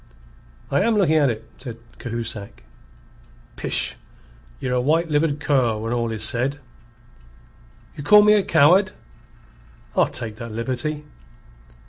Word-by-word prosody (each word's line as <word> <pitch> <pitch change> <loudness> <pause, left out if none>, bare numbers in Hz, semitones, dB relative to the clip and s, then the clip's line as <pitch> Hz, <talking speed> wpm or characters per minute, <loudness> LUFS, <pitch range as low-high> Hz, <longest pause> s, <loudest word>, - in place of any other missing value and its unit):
"I 140 - +2
am 225 +2 +1
looking 160 -6 +3
at 145 -3 +3
it," 110 -1 -5
said 120 -4 -9 0.2
Cahusac. 115 -4 -5 0.9
"Pish! - - +3 0.6
Ye're 125 - -3
a 125 - +1
white 160 +5 +1
livered 150 0 +1
cur 130 -7 +1
when 115 +2 -4
all 120 -1 -1
is 110 -1 -3
said." 130 +5 0 1.4
"You - - -8
call 210 +6 +7
me 210 0 +5
a 210 - +4
coward?" 180 +4 +3 1.0
"I'll - - +3
take 110 -3 -5
that 115 -2 -8
liberty." 130 +6 -3
135 Hz, 130 wpm, -22 LUFS, 115-155 Hz, 1.4 s, call